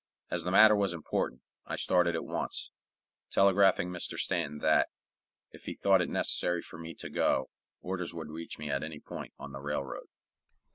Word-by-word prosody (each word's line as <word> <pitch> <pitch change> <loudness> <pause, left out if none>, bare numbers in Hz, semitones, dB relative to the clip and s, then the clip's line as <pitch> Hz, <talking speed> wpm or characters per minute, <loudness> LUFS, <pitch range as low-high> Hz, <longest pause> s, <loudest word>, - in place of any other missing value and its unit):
As 90 - 0
the 90 - -2
matter 105 +3 +8
was 100 -3 +1
important, 85 -3 -2 0.2
I - - -2
started 90 -2 +3
at 80 - -3
once, - - -3 0.6
telegraphing 95 -2 +4
Mr. 90 - -2
Stanton 75 +1 0
that, 80 +1 +3 0.6
if - - -14
he - - -4
thought 95 -2 +4
it 85 - 0
unnecessary 90 -1 0
for 80 - -11
me 85 0 -7
to - - -7
go, - - +1 0.3
orders 90 -2 -3
would 80 -2 -6
reach 80 +1 -6
me 75 -1 -4
at 70 - 0
any 80 -1 -6
point - - -8
on 70 - -8
the 70 0 -7
railroad. 75 -1 -4
85 Hz, 180 wpm, -31 LUFS, 75-90 Hz, 0.6 s, matter